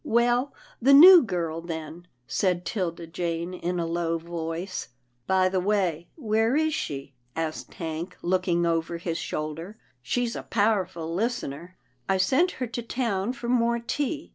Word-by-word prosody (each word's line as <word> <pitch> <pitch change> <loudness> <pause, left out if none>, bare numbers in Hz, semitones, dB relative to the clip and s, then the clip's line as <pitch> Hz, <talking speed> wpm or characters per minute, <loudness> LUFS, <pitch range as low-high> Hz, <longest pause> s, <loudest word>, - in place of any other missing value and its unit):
" - - -43 0.2
Well, 245 +3 +2 0.3
the 275 +3 +7
new 355 +4 +11
girl, 170 - -2
then," 165 +1 -7 0.2
said 180 - 0
'Tilda 175 -5 -3
Jane 170 +1 -3
in 180 0 -2
a 170 - 0
low 165 0 -1
voice. 170 +2 -5 0.2
" 120 0 -45
By 185 -1 +3
the 185 0 0
way, 180 -4 0
where 225 -3 +1
is 315 0 +2
she? 140 - -4
" 120 - -42
asked 160 -1 -4
Hank, 165 +2 -5
look 185 +1 0
ing 175 -1 +2
over 165 0 0
his 170 -1 -3
shoulder, 160 +7 -5
" 125 - -40
she's 235 - -1
a - - -4
powerful 190 -6 0
lis 230 +7 0
tener." 170 +7 -8
" 125 -1 -27
I 190 - +3
sent 265 - +3
her 255 - -3
to 240 +1 -5
town 230 -3 -1
for 245 -2 -7
more 235 -1 +2
tea. 290 +6 -3
180 Hz, 180 wpm, -26 LUFS, 165-230 Hz, 0.3 s, new